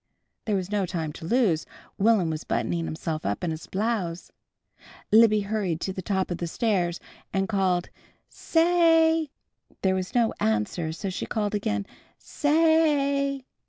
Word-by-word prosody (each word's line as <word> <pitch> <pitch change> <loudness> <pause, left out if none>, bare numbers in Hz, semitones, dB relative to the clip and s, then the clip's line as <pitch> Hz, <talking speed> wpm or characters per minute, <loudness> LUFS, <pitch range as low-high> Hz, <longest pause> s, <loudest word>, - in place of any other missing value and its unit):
There 210 - 0
was 190 0 -3
no 200 -3 0
time 160 -3 -3
to 160 - -8
lose. 215 -9 +2 0.3
Will'm 200 -5 +3
was 155 0 -4
buttoning 170 -1 -1
himself 160 -1 -4
up 100 - -2
in 170 - 0
his 160 +1 -7
blouse. 190 -4 -2 0.8
Libby 215 -1 +6
hurried 200 -5 -2
to 190 - -2
the 185 - -5
top 190 0 -1
of 175 - -3
the 170 - -2
stairs 180 -3 0 0.3
and 195 0 0
called: 190 -4 0 0.4
"Sa 325 - 0
ay!" 325 -2 +4 0.5
There 190 -1 +3
was 185 +3 -3
no 235 -2 +3
answer, 110 +10 0
so 185 +4 -4
she - - -4
called 210 -2 -2
again, 105 - -1 0.3
"Sa 290 - -3
ay!" 285 -4 +2
195 Hz, 160 wpm, -26 LUFS, 170-235 Hz, 0.8 s, Libby